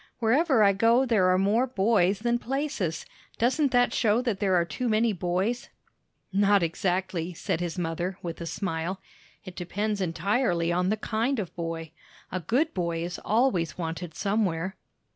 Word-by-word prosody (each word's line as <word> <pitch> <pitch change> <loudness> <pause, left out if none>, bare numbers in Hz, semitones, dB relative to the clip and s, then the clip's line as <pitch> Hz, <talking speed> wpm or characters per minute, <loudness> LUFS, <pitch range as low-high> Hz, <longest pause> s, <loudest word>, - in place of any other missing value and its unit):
Wherever 255 +2 +3
I 200 -1 +5
go, 230 +6 +4
there 210 -7 +3
are 185 - +4
more 210 +7 +2
boys 200 -4 +2
than 240 +1 +1
places. 250 - -2 0.3
Doesn't 265 +5 +2
that 245 -1 +3
show 220 -1 +2
that 225 -6 -1
there 195 -3 +2
are 170 -1 +3
too 235 +10 -3
many 220 0 +2
boys?" 185 +6 -1 0.6
"Not 200 -1 +4
exactly," 180 0 -1
said 160 - -2
his 175 -1 -3
mother, 175 +2 -2
with 170 -1 -5
a 170 - -4
smile. 185 0 -3 0.5
"It 185 -2 -9
depends 205 +3 -2
entirely 180 -1 0
on 180 +2 +1
the 215 - +1
kind 230 +5 -1
of 195 -6 -4
boy. 165 -2 -4 0.4
A 185 - -2
good 250 - 0
boy 170 -2 -2
is 175 +1 -5
always 205 - +1
wanted 165 -1 -5
somewhere." 195 -3 -1
195 Hz, 160 wpm, -27 LUFS, 175-230 Hz, 0.6 s, I